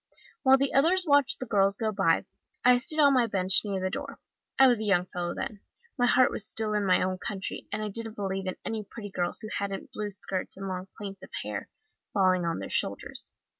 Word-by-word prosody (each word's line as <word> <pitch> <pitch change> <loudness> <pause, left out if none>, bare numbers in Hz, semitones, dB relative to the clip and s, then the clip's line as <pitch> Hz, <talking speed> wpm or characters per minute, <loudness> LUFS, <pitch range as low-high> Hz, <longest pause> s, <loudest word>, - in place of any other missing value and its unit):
While 265 -1 +6
the 275 0 0
others 350 +7 +4
watched 285 -2 +4
the 255 - -4
girls 200 -3 +2
go 220 -2 -1
by, 195 -4 +2 0.4
I 250 0 +7
stayed 310 +4 +3
on 285 -2 +6
my 250 -3 +3
bench 190 -2 +2
near 200 -2 -2
the 185 0 -2
door. - - -6 0.4
I 270 - +7
was 240 -3 +3
a - - -2
young 195 -4 +2
fellow 175 -1 -4
then 210 - -5 0.4
my 245 -2 +2
heart 255 +1 +4
was - - -1
still 215 0 +1
in 205 -1 0
my 185 - +4
own 185 0 -2
country, 195 -3 -5
and 215 +1 -3
I 210 - -3
didn't 225 +1 -1
believe 195 -1 -3
in 185 - -2
any 220 -1 -3
pretty 205 0 -9
girls 175 -2 -2
who 215 - -7
hadn't 200 -1 -4
blue 210 -1 -4
skirts 195 -2 -5
and 195 0 -5
long 185 0 -4
plaits 195 -2 -7
of - - -11
hair - - -5 0.5
falling 185 -2 +3
on 165 -1 -1
their - - -5
shoulders. - - -2
205 Hz, 225 wpm, -28 LUFS, 190-235 Hz, 0.5 s, I